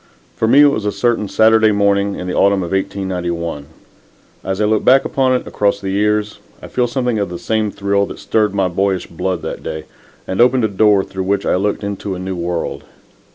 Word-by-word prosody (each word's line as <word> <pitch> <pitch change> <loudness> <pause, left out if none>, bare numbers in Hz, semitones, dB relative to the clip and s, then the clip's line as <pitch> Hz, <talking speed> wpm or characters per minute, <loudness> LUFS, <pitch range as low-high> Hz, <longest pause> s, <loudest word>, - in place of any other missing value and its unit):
For 110 - 0
me 135 +5 +6
it 145 - +7
was 110 - -2
a 105 - +1
certain 115 -4 0
Saturday 110 0 +4
morning 100 -1 +1
in - - -6
the 90 - -3
autumn 100 -1 +2
of 85 - -6
1891. 90 -6 -3 0.8
As 95 0 -3
I 105 - +2
look 110 0 +1
back 135 +1 +5
upon 130 -1 +1
it, 125 - -1
across 100 -1 0
the 95 -1 -4
years, 105 +1 0 0.2
I - - -11
feel 125 -1 0
something 125 -2 -1
of 100 - -1
the 90 - -6
same 110 +2 -1
thrill 100 0 0
that - - -9
stirred 105 -3 0
my 95 -2 +2
boyish 95 0 -1
blood 90 0 -3
that - - -5
day 80 0 -5 0.4
and 95 - 0
opened 125 0 +4
a - - +3
door 100 0 +3
through 95 -1 -5
which 100 +1 0
I - - +1
looked 100 +3 -1
into 100 -1 -4
a - - -6
new 95 0 -4
world. 85 0 -3
100 Hz, 215 wpm, -17 LUFS, 95-110 Hz, 0.8 s, it